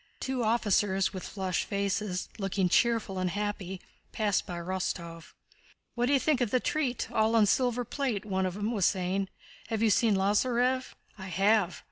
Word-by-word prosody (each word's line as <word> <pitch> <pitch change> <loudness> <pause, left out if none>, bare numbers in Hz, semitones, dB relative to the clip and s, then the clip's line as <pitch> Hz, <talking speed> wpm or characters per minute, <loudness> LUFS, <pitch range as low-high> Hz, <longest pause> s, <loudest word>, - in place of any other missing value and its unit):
Two 260 -2 -2
officers 205 -4 +2
with 185 - -5
flushed 190 -3 -2
faces, 200 -1 -2
looking 195 -2 0
cheerful 225 -3 +2
and 185 0 0
happy, 200 -1 -3 0.3
passed 210 -3 0
by 175 - -5
Rostóv. 170 -2 -4 0.6
"What 240 0 0
d'you 275 0 +4
think 290 -2 +1
of 240 - +1
the 255 - +2
treat? 260 -3 -1
All 220 +1 +2
on 220 -2 +6
silver 245 +3 +1
plate," 240 -6 -2
one 190 -2 0
of 180 - -5
them 210 +2 -2
was 205 -6 +2
saying. 190 0 -1 0.4
"Have 225 -1 -1
you 220 - +4
seen 220 -1 +3
Lázarev?" 245 +6 +1 0.2
"I 190 - -7
have." 195 -1 +2
205 Hz, 165 wpm, -29 LUFS, 190-235 Hz, 0.6 s, on